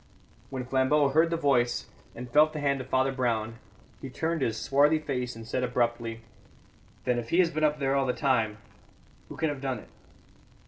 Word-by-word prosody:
When 130 Hz, -2 st, -5 dB
Flambeau 135 Hz, +3 st, +2 dB
heard 160 Hz, +4 st, +3 dB
the 165 Hz, -, -1 dB
voice, 130 Hz, -6 st, +1 dB, 0.3 s
and 125 Hz, +1 st, -7 dB
felt 150 Hz, +5 st, +4 dB
the 155 Hz, -, -4 dB
hand 140 Hz, -2 st, 0 dB
of 130 Hz, -, -9 dB
Father 130 Hz, +1 st, +1 dB
Brown, 115 Hz, -3 st, -2 dB, 0.4 s
he 135 Hz, -, -6 dB
turned 160 Hz, +4 st, -2 dB
his 115 Hz, -4 st, 0 dB
swarthy 145 Hz, +6 st, +3 dB
face 125 Hz, -6 st, -3 dB
and 115 Hz, 0 st, -9 dB
said 130 Hz, -, -1 dB
abruptly: 120 Hz, -2 st, -1 dB, 0.8 s
"Then, 125 Hz, -1 st, +1 dB
if 115 Hz, -1 st, -7 dB
he 170 Hz, -, +1 dB
has 175 Hz, -2 st, +4 dB
been 155 Hz, -1 st, -2 dB
up 150 Hz, 0 st, +3 dB
there 135 Hz, -2 st, 0 dB
all 135 Hz, -1 st, +1 dB
the -, -, +2 dB
time, 115 Hz, -7 st, +1 dB, 0.7 s
who -, -, -9 dB
can 160 Hz, -, 0 dB
have 145 Hz, -2 st, -5 dB
done 135 Hz, -2 st, -2 dB
it?" -, -, -13 dB
130 Hz, 195 wpm, -28 LUFS, 120-150 Hz, 0.8 s, felt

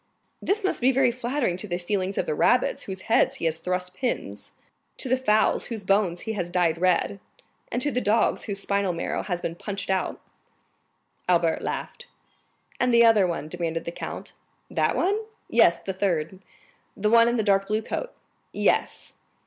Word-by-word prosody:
"This 415 Hz, +2 st, 0 dB
must 380 Hz, -, 0 dB
be 255 Hz, +2 st, +5 dB
very 260 Hz, -1 st, +3 dB
flattering 240 Hz, -5 st, -1 dB
to 210 Hz, -, -5 dB
the 175 Hz, -2 st, -2 dB
feelings 190 Hz, +1 st, -2 dB
of -, -, 0 dB
the -, -, -1 dB
rabbits 245 Hz, +11 st, +2 dB
into -, -, -6 dB
whose 190 Hz, 0 st, -6 dB
heads 225 Hz, -, +2 dB
he -, -, -5 dB
has 160 Hz, 0 st, 0 dB
thrust 180 Hz, +1 st, -2 dB
pins, 245 Hz, +6 st, -4 dB, 0.5 s
to -, -, -4 dB
the 255 Hz, -, +3 dB
fowls 220 Hz, -5 st, +2 dB
whose 225 Hz, -4 st, -6 dB
bones 190 Hz, -3 st, +1 dB
he 220 Hz, -, -4 dB
has 180 Hz, -5 st, -3 dB
dyed 170 Hz, -2 st, +1 dB
red, 185 Hz, +2 st, +1 dB, 0.5 s
and 245 Hz, +2 st, 0 dB
to 290 Hz, -, +1 dB
the 250 Hz, 0 st, 0 dB
dogs 220 Hz, +1 st, +2 dB
whose 200 Hz, -2 st, -3 dB
spinal 200 Hz, -2 st, 0 dB
marrow 170 Hz, -, -2 dB
he -, -, -10 dB
has 180 Hz, -3 st, -3 dB
punched 200 Hz, -1 st, -4 dB
out?" 190 Hz, -1 st, -1 dB, 1.1 s
Albert 170 Hz, -2 st, +2 dB
laughed. 480 Hz, -, -5 dB, 0.7 s
"And 250 Hz, -, +2 dB
the 235 Hz, 0 st, +6 dB
other 215 Hz, -5 st, +5 dB
one?" 165 Hz, -3 st, -3 dB
demanded 165 Hz, -1 st, -3 dB
the 170 Hz, -, -3 dB
count. -, -, -7 dB, 0.4 s
"That -, -, +1 dB
one?" 405 Hz, +4 st, +1 dB, 0.3 s
"Yes, -, -, +4 dB
the 190 Hz, -, -5 dB
third." 185 Hz, -2 st, -1 dB, 0.6 s
"The 210 Hz, +2 st, +1 dB
one 230 Hz, 0 st, +6 dB
in 240 Hz, -, +1 dB
the 220 Hz, -, +1 dB
dark 195 Hz, -1 st, +2 dB
blue 215 Hz, +1 st, 0 dB
coat?" -, -, -4 dB, 0.4 s
"Yes." -, -, 0 dB
200 Hz, 185 wpm, -25 LUFS, 180-235 Hz, 1.1 s, the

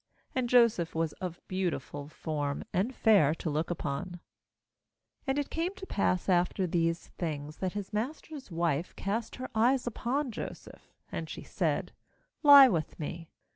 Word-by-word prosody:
And 250 Hz, -2 st, 0 dB
Joseph 230 Hz, -10 st, +4 dB
was 160 Hz, -1 st, 0 dB
of 180 Hz, -2 st, -4 dB
beautiful 175 Hz, -6 st, -3 dB
form, 145 Hz, -2 st, -3 dB
and 195 Hz, +8 st, +1 dB
fair 165 Hz, -9 st, +5 dB
to 160 Hz, -, -3 dB
look 155 Hz, +2 st, -1 dB
upon, 145 Hz, -3 st, -2 dB, 1.2 s
7 -, -, -34 dB
And 270 Hz, +1 st, +1 dB
it 290 Hz, -, -2 dB
came 345 Hz, +4 st, -1 dB
to 380 Hz, -, -8 dB
pass 185 Hz, -, 0 dB
after 180 Hz, +1 st, +2 dB
these 165 Hz, -1 st, 0 dB
things, 150 Hz, -3 st, -4 dB
that 185 Hz, -1 st, -2 dB
his 205 Hz, 0 st, -5 dB
master's 270 Hz, +4 st, -4 dB
wife 165 Hz, -2 st, -1 dB
cast 215 Hz, +4 st, -3 dB
her 255 Hz, 0 st, -7 dB
eyes 245 Hz, +4 st, +3 dB
upon 250 Hz, +3 st, -1 dB
Joseph; 220 Hz, -, -9 dB, 0.2 s
and -, -, -4 dB
she -, -, -7 dB
said: -, -, -1 dB, 0.5 s
'Lie 285 Hz, -3 st, +10 dB
with 165 Hz, -5 st, -2 dB
me.' 165 Hz, +2 st, -5 dB
185 Hz, 155 wpm, -30 LUFS, 165-245 Hz, 1.2 s, Lie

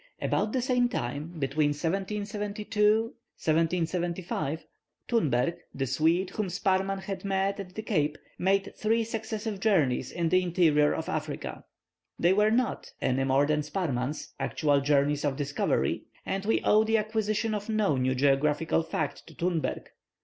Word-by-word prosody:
About 215 Hz, -, 0 dB
the 255 Hz, 0 st, 0 dB
same 245 Hz, -1 st, +2 dB
time, 145 Hz, -, -4 dB
between 145 Hz, +1 st, +1 dB
1772 210 Hz, +5 st, 0 dB, 0.4 s
1775, 165 Hz, -1 st, -1 dB, 0.4 s
Thunberg, 160 Hz, -, +1 dB, 0.2 s
the 135 Hz, -, -1 dB
Swede, 165 Hz, +8 st, +1 dB
whom 210 Hz, -1 st, -2 dB
Sparrman 190 Hz, +1 st, 0 dB
had 190 Hz, -1 st, -5 dB
met 195 Hz, 0 st, 0 dB
at 185 Hz, -2 st, -8 dB
the 220 Hz, -, -4 dB
Cape, 155 Hz, -9 st, 0 dB, 0.2 s
made 195 Hz, +2 st, +1 dB
three 225 Hz, +2 st, +1 dB
successive 220 Hz, -2 st, -4 dB
journeys 175 Hz, -, +2 dB
in 170 Hz, -2 st, -1 dB
the 185 Hz, +1 st, +4 dB
interior 165 Hz, -5 st, +3 dB
of 160 Hz, -, -3 dB
Africa. 155 Hz, -1 st, -4 dB, 0.5 s
They 175 Hz, +2 st, +4 dB
were 210 Hz, +2 st, +4 dB
not, 240 Hz, +2 st, 0 dB
any 130 Hz, +1 st, +1 dB
more 135 Hz, +2 st, +3 dB
than 150 Hz, 0 st, +1 dB
Sparrman's, 150 Hz, -4 st, -3 dB
actual 145 Hz, -3 st, +1 dB
journeys 145 Hz, +1 st, +2 dB
of 145 Hz, -2 st, 0 dB
discovery; 145 Hz, 0 st, 0 dB, 0.2 s
and 195 Hz, +1 st, -2 dB
we 225 Hz, -, +2 dB
owe 215 Hz, +1 st, +5 dB
the 225 Hz, +1 st, +2 dB
acquisition 215 Hz, 0 st, 0 dB
of 210 Hz, +1 st, -4 dB
no 215 Hz, -8 st, +2 dB
new 130 Hz, 0 st, +1 dB
geographical 145 Hz, +4 st, +2 dB
fact 155 Hz, -2 st, -3 dB
to -, -, -14 dB
Thunberg. 170 Hz, -2 st, -1 dB
180 Hz, 145 wpm, -28 LUFS, 150-210 Hz, 0.5 s, owe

